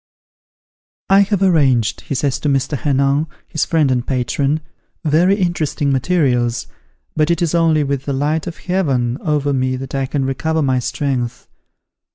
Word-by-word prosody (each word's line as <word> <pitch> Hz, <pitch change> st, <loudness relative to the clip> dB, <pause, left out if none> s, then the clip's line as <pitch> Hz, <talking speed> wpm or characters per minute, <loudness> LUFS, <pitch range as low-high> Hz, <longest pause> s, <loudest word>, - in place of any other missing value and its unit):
"I 195 Hz, -, +7 dB
have 200 Hz, -1 st, +2 dB
arranged," 135 Hz, -, +2 dB
he 140 Hz, -, -4 dB
says 135 Hz, -1 st, 0 dB
to 150 Hz, -, -1 dB
Mr. 135 Hz, +2 st, 0 dB
Henin, 140 Hz, +2 st, +1 dB, 0.2 s
his 155 Hz, -, -1 dB
friend 155 Hz, -5 st, +2 dB
and 125 Hz, -1 st, +1 dB
patron, 140 Hz, +3 st, 0 dB, 0.4 s
"very 170 Hz, +6 st, +3 dB
interesting 165 Hz, -7 st, 0 dB
materials, 130 Hz, -5 st, +1 dB, 0.5 s
but 155 Hz, +1 st, +2 dB
it 170 Hz, -, +1 dB
is 170 Hz, -2 st, 0 dB
only 165 Hz, -3 st, +3 dB
with 140 Hz, -1 st, -2 dB
the 140 Hz, -, -2 dB
light 150 Hz, +4 st, -1 dB
of 170 Hz, -, -6 dB
Heaven 135 Hz, -9 st, -1 dB
over 145 Hz, -4 st, 0 dB
me 130 Hz, -1 st, 0 dB
that 130 Hz, 0 st, -7 dB
I 135 Hz, -1 st, -1 dB
can 135 Hz, 0 st, -1 dB
recover 160 Hz, +4 st, -1 dB
my 130 Hz, -2 st, +1 dB
strength. 125 Hz, -1 st, -3 dB
145 Hz, 160 wpm, -18 LUFS, 130-160 Hz, 0.5 s, I